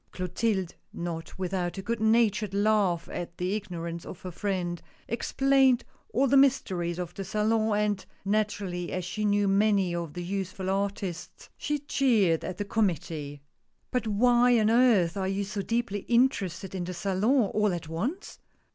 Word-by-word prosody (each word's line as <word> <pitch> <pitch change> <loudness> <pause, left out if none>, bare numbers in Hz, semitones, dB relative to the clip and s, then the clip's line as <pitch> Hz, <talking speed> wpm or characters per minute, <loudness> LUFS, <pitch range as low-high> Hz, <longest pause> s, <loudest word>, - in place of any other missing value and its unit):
Clotilde 185 0 -1 0.2
— - - -40 0.2
not 165 0 -8
without 185 -1 -2
a 195 - -5
good 230 +2 -2
natured 220 -2 +2
laugh 200 -5 +2
at 170 0 -6
the 180 +2 -1
ignorance 170 -5 -4
of 180 - -9
her 185 - -5
friend 175 -2 -2
— - - -31
explained 265 +2 +3 0.3
all 275 - +2
the 275 +1 +3
mysteries 190 -11 +2
of 175 -1 -5
the 195 - -5
Salon, 215 +2 +1
and, 210 -2 0 0.2
naturally 200 -4 -1
as 185 -1 -3
she 210 +4 -3
knew 205 0 +2
many 195 -2 +3
of 170 -3 -4
the 175 0 -5
youthfuTartists, 195 -1 -3
she 295 - -2
jeered 215 - +3
at 185 - -5
the 205 - -3
committee. 160 -8 -2 0.2
" - - -46
But 250 -3 -1
why 240 +3 +4
on 215 0 +3
earth 225 -8 +4
are 190 -1 -1
you 195 +1 -1
so 200 0 -4
deeply 230 -1 -1
interested 200 -7 +1
in 180 -2 -3
the 180 0 -5
Salon 200 +6 +1
all 210 -1 +2
at 170 -2 -4
once 230 - -4
200 Hz, 165 wpm, -28 LUFS, 180-220 Hz, 0.3 s, why